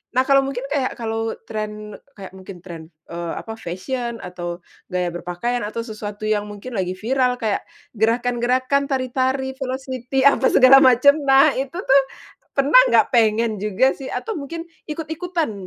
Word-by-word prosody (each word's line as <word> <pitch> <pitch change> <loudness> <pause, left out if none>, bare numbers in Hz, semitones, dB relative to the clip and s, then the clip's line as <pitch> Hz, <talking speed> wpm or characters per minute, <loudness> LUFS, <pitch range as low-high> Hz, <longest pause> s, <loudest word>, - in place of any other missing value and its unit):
Nah 255 - +4
kalo 275 0 +4
mungkin 270 -1 -3
kaya 270 -3 -1
kalo 225 -1 -3
trend 210 -1 -6 0.2
kaya 195 -2 -10
mungkin 190 -1 -12
trend, 165 -3 -9 0.2
eee, 170 0 -4
apa, 225 0 -7
fashion, 235 +6 -5
atau 175 -1 -6 0.2
gaya 180 -2 -2
berpakaian, 180 +8 -3
atau 230 +2 -4
sesuatu 215 -2 -7
yang 210 -1 0
mungkin 205 +5 -9
lagi 185 -4 -2
viral 250 +4 0
kayak 220 -4 -2 0.2
gerakan-gerakan, 245 +4 +1
tari-tari, 260 0 -1
velocity, 260 0 -3
apa 275 -1 +5
segala 270 +1 +7
macam. 270 +3 +5
Nah, 275 +3 +6
itu 275 +4 -4
tuh 275 +1 +5 0.5
pernah 280 - +6
nggak - - +3
pengen 225 -3 +2
juga 210 +6 +2
sih? 270 - -8
Atau 445 -7 -4
mungkin 330 +4 -6 0.2
ikut-ikutan, 320 0 -3
240 Hz, 150 wpm, -21 LUFS, 210-270 Hz, 0.5 s, segala